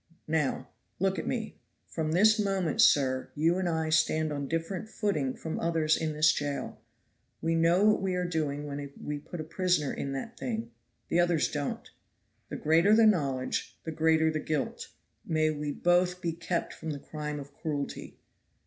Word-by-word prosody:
Now, 150 -5 0 0.3
look 195 +1 0
at - - -5
me; 225 -3 -3 0.3
from 155 -2 -3
this 215 +5 +5
moment, 195 -5 +1
sir, 130 -2 +4
you 165 +4 +2
and 185 -2 0
I 160 -1 -1
stand 155 -1 +2
on 140 -1 -3
a - - -7
different 165 +6 -3
footing 155 - -1
from 160 - -5
others 160 -2 +2
in 160 -1 -2
this 155 +1 +5
jail. 140 -6 -4 0.6
We 165 0 0
know 165 +3 +3
what 215 -2 +4
we 190 -1 0
are 180 0 0
doing 150 -4 -2
when 140 -1 -5
we 150 0 -4
put 170 +4 -8
a - - -3
prisoner 165 -2 0
in 140 - -4
that 135 - -6
thing; 115 -3 -3 0.4
the 170 - +2
others 175 -3 +2
don't. 145 -2 -3 0.6
The - - -5
greater 165 +7 +4
the 225 0 +6
knowledge, 140 -11 0
the 160 - -4
greater 160 0 +3
the 155 - -2
guilt. 150 -2 -3 0.4
May 155 -1 +1
we 150 -1 -3
both 180 +3 +2
be 170 -2 -1
kept 170 +1 -3
from 160 - -7
the 145 -2 -4
crime 150 0 -5
of 140 0 -10
cruelty. 145 -2 -5
160 Hz, 180 wpm, -29 LUFS, 145-175 Hz, 0.6 s, the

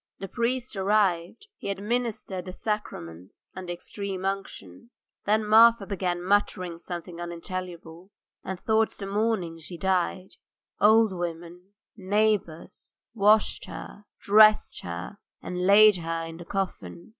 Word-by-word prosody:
The 195 - -6
priest 245 +2 -2
arrived; 195 - 0
he - - -6
administered 205 -2 -3
the 185 - -6
sacrament 95 - -5 0.2
and 185 -1 -7
extreme 190 +2 -5
unction. 195 - -5 0.4
Then 215 +1 +2
Marfa 225 0 +6
began 180 -3 -2
muttering 185 -3 0
something 175 -1 -7
unintelligible, 175 0 -7 0.3
and 190 -1 -5
towards 220 0 +1
morning 195 -4 -1
she 170 +2 -8
died. 185 0 -1 0.4
Old 220 0 +5
women, 175 +2 -7 0.2
neighbours, 200 -4 -1 0.2
washed 215 0 +3
her, 205 - -10
dressed 215 +1 +5
her, 85 - -7 0.2
and 180 0 -3
laid 210 0 +7
her 165 -1 -3
in 165 0 -9
the 175 - -10
coffin. 175 - -5
190 Hz, 120 wpm, -26 LUFS, 175-210 Hz, 0.4 s, laid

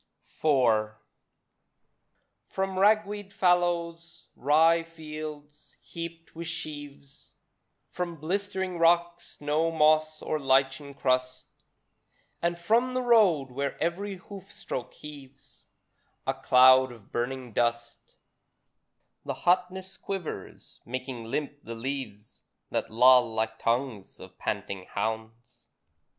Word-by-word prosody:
IV 115 -8 +3 1.5
From 190 -1 -2
ragweed 205 -1 +2
fallows, 170 -2 0
rye 160 +5 +4
fields, 155 -2 -9
heaped 165 0 -8
with 165 0 -6
sheaves, 145 -3 -8 0.5
From 175 -1 -4
blistering 190 +2 -3
rocks, 170 +1 +2
no 150 +3 +1
moss 155 -1 +3
or 155 - -1
lichens 135 +1 +1
crust, 130 -1 0 1.0
And 170 0 0
from 235 +8 +1
the 255 - 0
road, 190 - +4
where 140 +2 -3
every 190 +5 -2
hoof 195 +1 -12
stroke 125 - -6
heaves 140 -3 -13 0.6
A - - +1
cloud 130 0 +6
of 115 -4 -15
burning 125 0 -3
dust, 120 0 -2 1.1
The - - -4
hotness 185 +1 0
quivers, 195 -4 -7
making 130 -1 -5
limp 145 +4 -3
the 115 - -7
leaves, 115 -4 -6 0.3
That - - -1
loll 125 +1 +6
like 110 0 -1
tongues 115 -4 -2
of - - -13
panting 95 -2 -3
hounds. 110 +2 -5
150 Hz, 105 wpm, -28 LUFS, 130-175 Hz, 1.5 s, cloud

